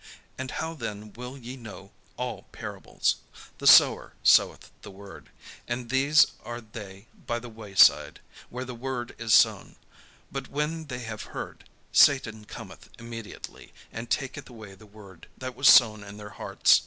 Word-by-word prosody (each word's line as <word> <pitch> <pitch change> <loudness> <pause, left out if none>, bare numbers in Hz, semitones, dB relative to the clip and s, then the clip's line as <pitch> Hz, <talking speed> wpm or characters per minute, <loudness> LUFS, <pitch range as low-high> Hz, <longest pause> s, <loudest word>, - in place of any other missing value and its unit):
And 130 0 -6
how 160 +4 -4
then 105 -7 -7
will 125 +3 -8
ye 125 0 -8
know 105 -5 -11 0.3
all - - -5
parables? - - -2 0.4
The - - -1
sower - - +6
soweth - - +4
the - - -10
word. 100 0 -13 0.4
And 120 0 -4
these 140 +4 +5 0.2
are 120 +2 -6
they 105 -3 -11 0.2
by 120 - -1
the 120 0 -8
way 110 -3 -12
side, - - +5 0.3
where 125 +1 -6
the 125 - -7
word 120 0 -5
is 115 0 +3
sown; 110 -5 +3 0.6
but 135 -1 -5
when 150 +3 -3
they 125 -4 -6
have 110 -2 -8
heard, - - -8 0.2
Satan 110 -6 +4
cometh - - -11
immediately, 115 -2 -10 0.2
and 115 +1 -7
taketh 130 +2 -3
away 110 -5 -11
the 110 +2 -17
word 100 -5 -15
that 130 -1 -6
was 135 +2 +2
sown 110 -4 +7
in 100 0 -11
their 105 -1 -9
hearts. - - +3
115 Hz, 160 wpm, -27 LUFS, 105-130 Hz, 0.6 s, sown